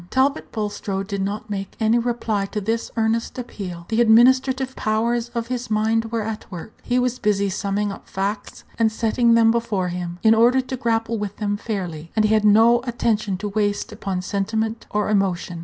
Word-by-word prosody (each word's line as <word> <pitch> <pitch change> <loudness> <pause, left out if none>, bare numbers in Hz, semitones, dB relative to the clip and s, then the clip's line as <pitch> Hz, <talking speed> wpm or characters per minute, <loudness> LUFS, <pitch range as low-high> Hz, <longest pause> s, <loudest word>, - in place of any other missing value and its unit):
Talbot 275 +3 +1
Bulstrode 205 -2 -3
did 200 0 -3
not 205 +3 -3
make 195 -1 -4
any 225 +2 +3
reply 230 -4 -1
to 210 - -3
this 225 +3 -2
earnest 225 +2 0
appeal. 185 -8 -6
The 225 +1 +2
administrative 260 +3 +4
powers 230 +2 0
of 230 -1 -1
his 245 0 -4
mind 220 +1 +1
were 225 -1 -2
at 215 -2 -6
work; 180 +4 -8
he 245 - 0
was 250 0 0
busy 200 -2 +1
summing 205 0 -1
up - - -10
facts, 200 +2 -4 0.2
and 225 -1 +3
setting 230 +1 +2
them 225 -1 +5
before 225 -6 -1
him, 175 -1 -5
in 220 0 +6
order 240 +3 +4
to 260 0 -3
grapple 230 -2 -1
with 205 -1 -5
them 205 -1 -1
fairly, 180 -7 -5
and 215 -1 +3
he 215 - +3
had 215 -1 +3
no 225 +3 +6
attention 220 -5 0
to 205 +2 -4
waste 205 0 -1
upon 185 -2 -4
sentiment 220 +4 -2
or 210 0 0
emotion. 190 -4 0
220 Hz, 190 wpm, -22 LUFS, 200-230 Hz, 0.2 s, in